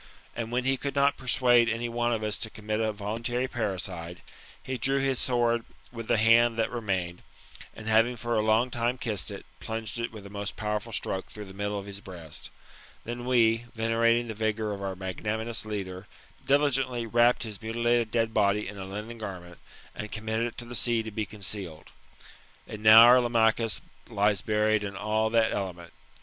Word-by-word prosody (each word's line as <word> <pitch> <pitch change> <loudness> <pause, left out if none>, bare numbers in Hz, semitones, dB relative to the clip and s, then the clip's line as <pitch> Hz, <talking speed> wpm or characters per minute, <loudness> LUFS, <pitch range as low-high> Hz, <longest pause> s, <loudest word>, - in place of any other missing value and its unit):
And 115 0 -4
when 125 +1 0
he 135 +1 +1
could 140 +1 -4
not 140 0 +3
persuade 120 -2 +3
any 115 +1 -1
one 120 0 0
of 110 -2 -1
us 105 -1 -1
to 110 - -5
commit 110 0 -3
a 110 -1 +1
voluntary 115 +5 -2
parricide^ 90 -7 -3 0.5
he 130 - -3
drew 135 +3 +1
his 135 -2 +1
sword 120 -2 +1 0.3
with 115 -2 -7
the - - +3
hand 115 +1 +5
that 115 - 0
remained, 95 -7 -2 0.5
and 110 - -10
having 115 +3 +4
for 120 +1 -3
a 110 - +3
long 110 +3 +2
time 120 +2 -1
kissed 105 -9 -3
it, - - -8
plunged 110 0 -5
it 115 - -2
with 105 -3 -10
a - - -9
most 100 0 -5
powerful 105 +1 -3
stroke 95 -3 -2
through 105 -1 -8
the 95 - -11
middle 100 +1 -3
of 100 - -5
his 100 -1 -6
breast 85 -6 -7 0.5
Then 120 +1 -5
we, 115 -2 +3
venerating 115 +1 +2
the 110 - -4
vigour 110 0 -1
of 100 -1 -5
our 95 -1 -3
magnanimous 110 +5 -3
leader, 95 -2 -5 0.4
diligently 135 -4 +2
wrapped 120 +2 +3
his 110 -2 -7
muti 115 +1 -3
lated 120 -1 +3
dead 115 -1 0
body 105 0 +2
in 100 0 -8
a 95 - -5
linen 105 +4 -7
garment, 90 -5 -8 0.3
and 105 - -6
committed 110 +1 -1
it 120 - -9
to 120 - -5
the 120 - -9
sea 120 0 +1
to 110 - -6
be 105 0 -3
concealed. 100 -6 -6 0.8
And 105 - -8
now 110 +1 +10
our 125 +2 +8
Lamachus 115 -2 +2 0.3
lies 100 -1 +2
buried 105 0 +1
in 100 -1 -5
all 110 +2 0
that 115 -1 +3
element. 90 -4 -5
110 Hz, 190 wpm, -28 LUFS, 105-120 Hz, 0.8 s, now